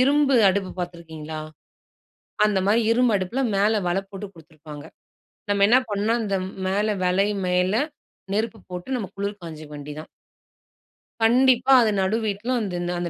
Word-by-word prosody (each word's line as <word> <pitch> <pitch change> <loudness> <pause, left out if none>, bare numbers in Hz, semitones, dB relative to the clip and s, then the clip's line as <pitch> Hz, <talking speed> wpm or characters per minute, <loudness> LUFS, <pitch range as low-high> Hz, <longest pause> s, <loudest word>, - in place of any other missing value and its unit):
இரும்பு 275 +1 +3 0.2
அடுப்பு 190 -1 -2
பார்த்துருக்கீங்களா? 160 -3 -6 1.1
அந்த 205 -2 +2
மாதிரி 225 +3 +4
இரும்பு 240 -1 +3
அடுப்புல 195 +9 -2 0.2
மேல 205 +2 +3 0.2
வல 185 +3 +1
போட்டு 200 +1 -7
கொடுத்திருப்பாங்க. 155 -2 -12 0.7
நம்ம 200 0 +3
என்ன 245 +3 +6
பண்ணோம் 215 +3 0
அந்த 200 -3 -1 0.3
மேல 205 +3 0 0.2
வலை 195 +3 +2 0.2
மேல 180 +1 +2 0.6
நெருப்பு 220 +1 -1
போட்டு 180 +9 -4
நம்ம 210 -6 -4
குளிர் 200 0 -4
காய்ஞ்சிக்க 155 -2 -8
வேண்டியது 145 +1 -8
தான். 155 - -12 1.2
கண்டிப்பா. 255 +2 +4
அது 220 -2 +2
நடு 200 +4 +1
வீட்ல 210 +4 -2
அந்த 195 -4 -3 0.2
அந்த 175 -1 -2
200 Hz, 140 wpm, -23 LUFS, 175-225 Hz, 1.2 s, என்ன